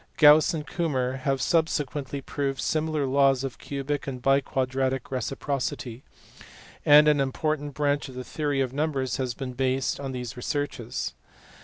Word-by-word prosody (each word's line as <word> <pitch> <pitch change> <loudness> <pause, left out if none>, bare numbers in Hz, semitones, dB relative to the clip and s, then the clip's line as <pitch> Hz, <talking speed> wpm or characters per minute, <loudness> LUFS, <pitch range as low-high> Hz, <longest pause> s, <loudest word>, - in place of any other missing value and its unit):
Gauss 150 0 +7
and 155 -3 -4
Kummer 135 -6 -1
have 135 0 0
subsequently 145 -4 0
proved 135 0 -3
similar 155 -2 0
laws 135 0 +3
of 130 -5 -5
cubic 140 +1 -3
and 130 -2 -4
biquadratic 135 0 0
reciprocity; 130 -2 -3 0.8
and 150 +1 +7
an 150 -1 +4
important 145 +1 -2
branch 145 -1 0
of 130 - -11
the 125 - -5
theory 145 +1 -1
of 130 -1 -1
numbers 140 -3 -1
has 125 -3 -2
been 130 -2 -5
based 130 +1 0
on 135 -1 -4
these 125 -1 -5
researches. 145 +4 -3
135 Hz, 145 wpm, -26 LUFS, 130-145 Hz, 0.8 s, Gauss